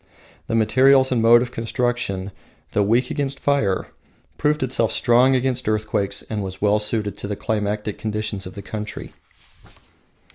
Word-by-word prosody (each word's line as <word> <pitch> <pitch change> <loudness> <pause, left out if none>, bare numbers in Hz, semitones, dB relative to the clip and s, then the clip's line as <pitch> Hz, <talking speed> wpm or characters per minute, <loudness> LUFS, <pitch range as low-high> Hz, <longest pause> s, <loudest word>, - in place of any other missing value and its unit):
The 115 - -1
material 130 +4 +5
and 120 -3 +2
mode 120 +1 +6
of 125 - -7
construction, 115 -5 -2 0.4
though 105 - +1
weak 115 +5 +2
against 140 -1 -3
fire, 125 -10 0 0.5
proved 150 -1 +1
itself 120 -3 0
strong 125 +3 +4
against 130 -2 0
earthquakes, 110 -2 -1
and 110 -2 -4
was 95 -1 -6
well 105 0 +2
suited 105 -1 -2
to - - -5
the 105 - -3
climatic 105 0 -2
conditions 105 -3 -3
of 90 - -11
the 100 - -8
country. 105 -1 -7
110 Hz, 150 wpm, -22 LUFS, 105-125 Hz, 0.5 s, mode